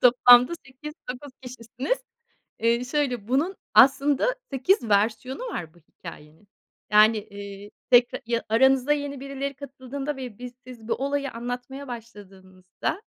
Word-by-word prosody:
toplamda 245 +2 +7
8-9 270 0 -9
kişisiniz. 250 - -4 0.6
Eee, 235 +2 +1
şöyle: 250 -5 -2
Bunun 300 +10 0 0.2
aslında 280 - +4
8 265 - +1
versiyonu 220 - 0
var, 165 - -6
bu 175 - -20
hikâyenin. 160 +3 -13 0.4
Yani, 215 0 +4
ııı, 200 0 -9 0.2
tekra 245 -1 +4
ya 235 0 -1
aranıza 265 +4 +4
yeni 285 -2 -3
birileri 275 0 -5
katıldığında 275 +1 -6
ve 250 -6 -8
biz 250 0 -8
siz 235 -3 -12
bu - - +1
olayı 280 +1 -2
anlatmaya 245 +4 -6
başladığınızda, 195 - -7
250 Hz, 125 wpm, -25 LUFS, 220-275 Hz, 0.6 s, toplamda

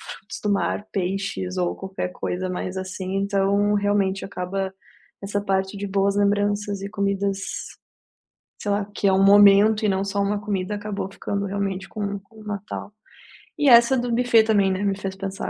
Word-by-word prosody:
frutos - - -9
do 210 - +1
mar, 205 +1 -1
peixes 190 0 -2
ou 180 -1 0
qualquer 190 -1 -5
coisa 185 +1 -3
mais 185 +1 -4
assim 190 0 -4
então 200 +1 +1
realmente 200 -1 +1
acaba 190 0 -3 0.5
essa 205 +1 -2
parte 190 0 -1
de 200 +1 -4
boas 195 0 +1
lembranças 205 0 +1
e 200 - -4
comidas, 200 -1 -1 1.2
sei 205 - -2
lá, 200 0 0
que - - -1
é 195 - +5
um 190 - +3
momento 205 +2 +6
e - - +3
não 190 -1 +1
só 200 0 -2
uma 205 +1 0
comida 205 -1 -2
acabou 205 -2 -4
ficando 200 0 -3
realmente 195 -1 -3
com 200 -2 -4
com 220 +3 -18
o - - -13
Natal. 205 0 -6 0.7
E 290 - +3
essa 235 +2 +7
do 245 0 -1
buffet 235 -1 +4
também, 205 -3 +3
né, 190 +1 -2
me 200 -1 0
fez 195 -1 -5
pensar 195 0 -5
200 Hz, 180 wpm, -23 LUFS, 195-205 Hz, 1.2 s, essa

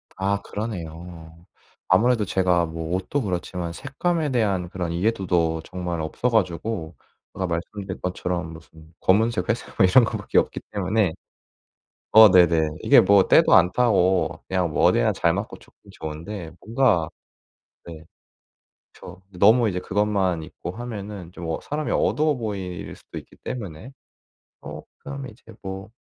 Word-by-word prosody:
아 100 +1 -1
그러네요. 85 -5 -7 0.4
아무래도 110 +4 +3
제가 90 -2 +2
뭐 80 +1 -5
옷도 95 +10 -2
그렇지만 90 -4 -3
색감에 150 - -2
대한 100 -8 0
그런 90 -2 -4
이해도도 85 -4 0
정말 90 -2 -4
없어 80 +10 -1
가지고 90 -4 -1 0.4
제가 95 - -3
말씀드린 95 +3 -5
것처럼 90 -2 -3
무슨 80 0 -15
검은색 110 +4 +2
회색 115 +1 -3
뭐 95 - +6
이런 115 +7 +6
것 - - -3
밖에 - - -2
없기 - - -2
때문에 100 -2 0 1.0
어 110 -1 +9
네네. 85 -4 +4
이게 - - +6
뭐 100 0 +4
때도 - - +5
안 90 +1 +6
타고 95 -7 +2
그냥 90 -2 0
뭐 - - 0
어디나 - - +3
잘 - - +1
맞고 - - -5
좋긴 - - -20
좋은데 80 +3 -7
뭔가 110 - +1 0.8
네. 80 -2 -10 0.9
그렇죠. 90 +1 -12 0.2
너무 110 +3 +5
이제 90 -2 -3
그것만 95 -4 0
입고 85 +3 -8
하면은 105 -5 -7
좀 85 -2 -8
어 80 - -2
사람이 150 +1 -3
어두워 155 0 +1
보일 100 -7 -5
수도 - - -12
있기 - - -11
때문에 110 - -7 0.7
어 - - -8 0.2
그 - - -8
다음에 135 -2 -6
이제 110 - -24 0.2
뭐 95 +2 -7
95 Hz, 300 characters per minute, -23 LUFS, 85-110 Hz, 1.0 s, 어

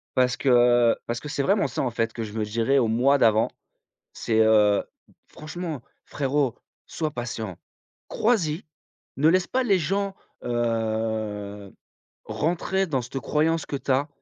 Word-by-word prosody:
parce 125 0 +2
que 120 -2 +4
parce 120 +1 -3
que 150 - -9
c'est 140 -1 -2
vraiment 195 -6 +2
ça 120 - -3
en 125 - -1
fait, 115 -1 -1
que 115 - -4
je 105 - -7
me 110 -1 -1
dirais 115 +6 +1
au 120 -4 +3
moi 130 +5 +3
d'avant. 110 -3 +3 0.6
C'est, 110 -1 0
heu: 105 -2 +4 0.4
«Franchement 155 -3 -6 0.2
frérot, 140 -3 -1 0.3
sois 155 -2 -3
patient, 110 -7 -5 0.5
crois-y, 185 -8 0 0.5
ne 150 +3 +4
laisse 185 +1 +3
pas 260 - 0
les 200 -5 +3
gens, 195 +4 -1 0.3
heu, 110 -3 -2 0.5
rentrer 180 +4 -1
dans 135 -5 0
cette 125 +3 -5
croyance 160 +2 0
que 140 - -4
tu 140 - -11
as, 140 +4 +2
125 Hz, 150 wpm, -25 LUFS, 115-155 Hz, 0.6 s, que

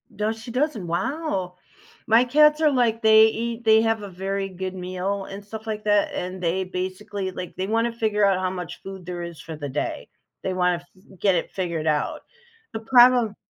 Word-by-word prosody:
Does 220 +2 -2
she 235 +1 -8
doesn't? 250 - -1
Wow. 190 - -2 0.5
My 225 +2 +6
cats 300 +4 +4
are 305 -2 +4
like, 235 -3 +1
they 220 0 +7
eat 230 +1 -3
they 220 -1 +6
have 225 -1 +1
a 200 - -6
very 195 +1 -3
good 185 0 -5
meal 185 +2 -3
and 195 +1 -8
stuff 220 +2 -9
like 215 -1 -4
that, 205 -1 +2
and 185 +1 -4
they 180 +2 0
basically, 185 +1 -4
like, 180 -1 -7
they 190 +1 -3
wanna 230 +2 +1
figure 215 -3 +1
out 195 -2 +3
how 185 0 0
much 180 -2 -7
food 190 -2 -8
there 175 0 -5
is 170 -2 -8
for 160 - -8
the 145 -2 -6
day. 140 +3 -3 0.4
They 190 - -1
wanna 180 -1 +2
f 175 +2 -18 0.2
get 195 -3 +3
it 170 - -2
figured 170 -4 -3
out. 150 -1 0 0.5
The 220 - -3
problem 240 -2 +5
195 Hz, 200 wpm, -24 LUFS, 180-225 Hz, 0.5 s, they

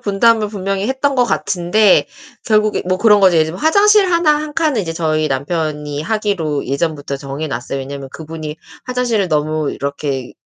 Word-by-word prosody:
분담을 215 +1 +2
분명히 195 -1 -3
했던 270 +1 0
것 250 -1 +3
같은데 195 -1 +2 0.4
결국에 215 -1 +2
뭐 185 0 +1
그런 210 -1 +4
거죠. 185 -3 +5
예를 160 - +4
들면 170 +4 -7
화장실 400 +3 +4
하나, 335 -3 +3
1 300 0 -5
칸은 300 -9 +1
이제 165 -3 -4
저희 155 -2 0
남편이 150 +1 -3
하기로 185 -7 -2
예전부터 145 0 -2
정해 140 +3 -5
놨어요. 130 +2 -4
왜냐면 135 0 -7
그분이 155 -1 -7 0.3
화장실을 245 -6 0
너무 155 0 0
이렇게 140 -2 -4
175 Hz, 375 characters per minute, -17 LUFS, 150-220 Hz, 0.4 s, 거죠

